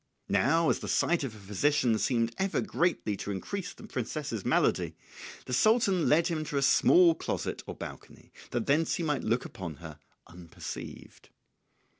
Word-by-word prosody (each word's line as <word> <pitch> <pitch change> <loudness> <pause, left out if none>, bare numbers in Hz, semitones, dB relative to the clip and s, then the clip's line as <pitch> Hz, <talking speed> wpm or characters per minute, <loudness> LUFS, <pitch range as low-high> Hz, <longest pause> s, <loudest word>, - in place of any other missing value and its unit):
Now 165 0 +3
as - - -1
the - - -6
sight 170 -3 +1
of 120 -5 -5
a - - -12
physician 110 +3 +1
seemed 115 -1 +1
ever 195 0 0
greatly 170 - 0
to - - -6
increase 190 - -4
the - - -13
princess's 130 - -4
malady, - - +1 0.5
the 125 - -5
Sultan 200 - +3
led 165 +3 +4
him 160 -3 -1
to 145 - -3
a 140 - +1
small 170 +5 +6
closet 160 - -4
or - - -6
balcony, - - -10 0.2
that 120 -2 -2
thence 155 +4 +2
he 170 - -3
might 150 -5 -1
look 115 +3 0
upon 85 -5 -7
her 75 +1 -11 0.3
unperceived. 85 -1 -10
140 Hz, 165 wpm, -29 LUFS, 110-170 Hz, 0.5 s, small